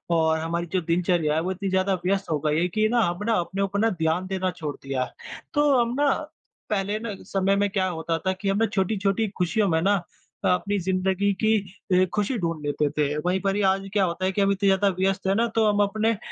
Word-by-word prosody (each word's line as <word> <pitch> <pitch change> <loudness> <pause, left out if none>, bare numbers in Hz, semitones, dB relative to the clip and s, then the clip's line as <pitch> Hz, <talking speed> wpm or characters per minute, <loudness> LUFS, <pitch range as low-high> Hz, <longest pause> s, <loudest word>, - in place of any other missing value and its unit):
और 160 -1 +2
हमारी 170 +2 -2
जो 185 - +2
दिनचर्या 170 -2 +1
है 160 - +1
वो 185 - -2
इतनी 195 +1 -3
ज़्यादा 190 +1 +1
व्यस्त 195 0 0
हो 155 - +1
गई 150 +1 +2
है 175 - +2
कि 215 +4 +1
ना, 240 +1 +2
हम 175 -4 0
ना 230 - +2
अपने 190 +3 -3
ऊपर 200 +3 +1
ध्यान 175 -1 -1
देना 185 -1 -1
छोड़ 150 -5 -5
दिया। 135 -2 -1 0.5
तो 295 -1 +3
हम 235 0 +1
ना 290 0 +4 0.6
पहले 205 0 -1
ना 220 -2 -5
समय 195 0 +1
में 200 0 +1
क्या 190 -2 0
होता 165 -2 -2
था 190 - +2
कि 190 +1 -3
हम 195 - +1
ना 225 - +3
छोटी-छोटी 200 +1 0
खुशियों 200 +4 +1
में 160 -1 +2
ना 200 +4 +3 0.5
अ, - - +4
अपनी 200 +3 +1
ज़िन्दगी 190 +2 0
की 220 - +4 0.4
ए 185 +1 +5
खुशी 210 +4 0
ढूँढ़ 165 -3 -2
लेते 145 0 0
थे। 150 0 +1
वहीं 180 +1 +1
पर 195 -1 0
ही 205 - 0
आज 195 +1 -1
क्या 205 -2 +3
होता 180 +1 -2
है 190 - +1
कि 200 - -1
हम 200 0 +3
इतने 200 0 0
ज़्यादा 195 +1 +3
व्यस्त 190 0 0
हैं 195 - +2
ना 230 +2 +2
तो 225 -1 +3
हम 205 -1 +2
अपने 215 +2 +1
अ, - - -6
190 Hz, 245 wpm, -25 LUFS, 175-205 Hz, 0.6 s, ए